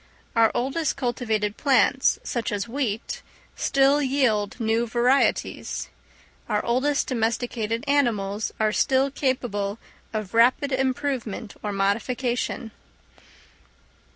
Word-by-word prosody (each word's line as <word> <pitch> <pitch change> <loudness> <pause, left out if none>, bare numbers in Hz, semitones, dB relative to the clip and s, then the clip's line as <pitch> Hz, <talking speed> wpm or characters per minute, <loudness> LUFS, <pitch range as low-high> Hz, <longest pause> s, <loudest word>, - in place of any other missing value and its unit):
Our 225 -1 +5
oldest 275 +5 -1
cultivated 225 -5 -1
plants, 270 -1 +3
such 235 -3 -2
as 205 +1 -2
wheat, 235 -4 -3 0.3
still 275 +2 +3
yield 255 -7 +1
new 225 +1 +1
varieties: 245 +4 +1 0.6
our - - 0
oldest 265 +5 +1
domesticated 230 -1 -1
animals 220 -7 +1
are 215 -1 +2
still 270 +3 +2
capable 230 -7 -1 0.3
of 215 -3 -4
rapid 250 +5 +4
improvement 260 -5 -2
or 210 - -3
modification. 235 +4 -1
240 Hz, 95 wpm, -25 LUFS, 220-265 Hz, 0.6 s, Our